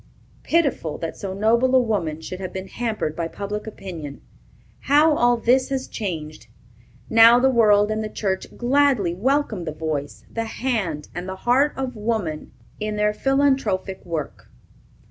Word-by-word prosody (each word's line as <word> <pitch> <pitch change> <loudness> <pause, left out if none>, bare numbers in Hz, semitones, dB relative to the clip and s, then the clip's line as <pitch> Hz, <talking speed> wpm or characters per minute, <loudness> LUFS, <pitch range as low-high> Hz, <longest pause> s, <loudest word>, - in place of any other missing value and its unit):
Pitiful, 280 - 0
that 165 - -5
so 195 - -5
noble 235 +5 +3
a - - +7
woman 185 -10 -1
should 185 +3 -7
have 185 -2 -5
been 190 0 -6
hampered 220 -10 -3
by 170 -1 -2
public 205 +4 -5
opinion. 165 -9 -8 0.6
How 300 +2 +4
all 240 -1 +3
this 250 +4 +2
has 265 -1 -2
changed! 160 -7 -5 0.6
Now, 230 +1 +7
the 265 +2 +3
world 210 -3 +4
and 215 0 -1
the 215 - -4
church 190 -3 -2
gladly 250 -7 +2
welcome 235 -1 0
the 155 - -3
voice, 150 -2 -4
the 230 0 -4
hand, 215 - -2
and 180 +2 -5
the 190 - -4
heart 270 +5 +3
of 265 -2 -3
woman 210 -8 -3 0.3
in 215 0 -3
their 210 0 +1
philanthropic 265 -8 0
work. 165 -5 -5
215 Hz, 155 wpm, -22 LUFS, 180-250 Hz, 0.6 s, a